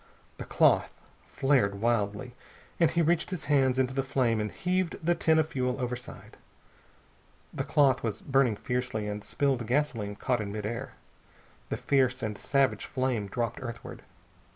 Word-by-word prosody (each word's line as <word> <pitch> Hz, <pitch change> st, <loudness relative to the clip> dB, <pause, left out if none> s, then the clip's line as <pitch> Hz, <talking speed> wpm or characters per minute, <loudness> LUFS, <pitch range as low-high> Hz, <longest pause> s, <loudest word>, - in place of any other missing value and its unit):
The -, -, -6 dB
cloth -, -, +3 dB, 0.4 s
flared 125 Hz, -8 st, +1 dB
wildly, 110 Hz, +1 st, 0 dB, 0.5 s
and 165 Hz, -3 st, +5 dB
he 170 Hz, -, +1 dB
reached 170 Hz, +1 st, +1 dB
his 185 Hz, -4 st, -5 dB
hands 135 Hz, -3 st, +3 dB
into 130 Hz, 0 st, +1 dB
the 135 Hz, -, 0 dB
flame 130 Hz, -4 st, +1 dB
and 105 Hz, -, -3 dB
heaved 180 Hz, -1 st, -1 dB
the 175 Hz, -, +4 dB
tin 160 Hz, -2 st, +2 dB
of 160 Hz, 0 st, +2 dB
fuel 125 Hz, -2 st, -1 dB
overside. 125 Hz, 0 st, -6 dB, 1.2 s
The -, -, -2 dB
cloth 140 Hz, -4 st, +3 dB
was 115 Hz, -3 st, -3 dB
burning 135 Hz, -5 st, +2 dB
fiercely, 125 Hz, -2 st, -2 dB
and 105 Hz, 0 st, -4 dB
spilled 135 Hz, -5 st, 0 dB
gasoline 120 Hz, -7 st, 0 dB
caught 125 Hz, +2 st, -1 dB
in 100 Hz, -1 st, -4 dB
mid 105 Hz, 0 st, -4 dB
air. 120 Hz, +3 st, -4 dB, 0.8 s
A -, -, -2 dB
fierce 130 Hz, -2 st, +1 dB
and 105 Hz, -1 st, -2 dB
savage 135 Hz, +6 st, +1 dB
flame 130 Hz, -6 st, -1 dB
dropped 115 Hz, +4 st, -3 dB
earthward. 120 Hz, -3 st, -7 dB
125 Hz, 155 wpm, -29 LUFS, 115-140 Hz, 1.2 s, and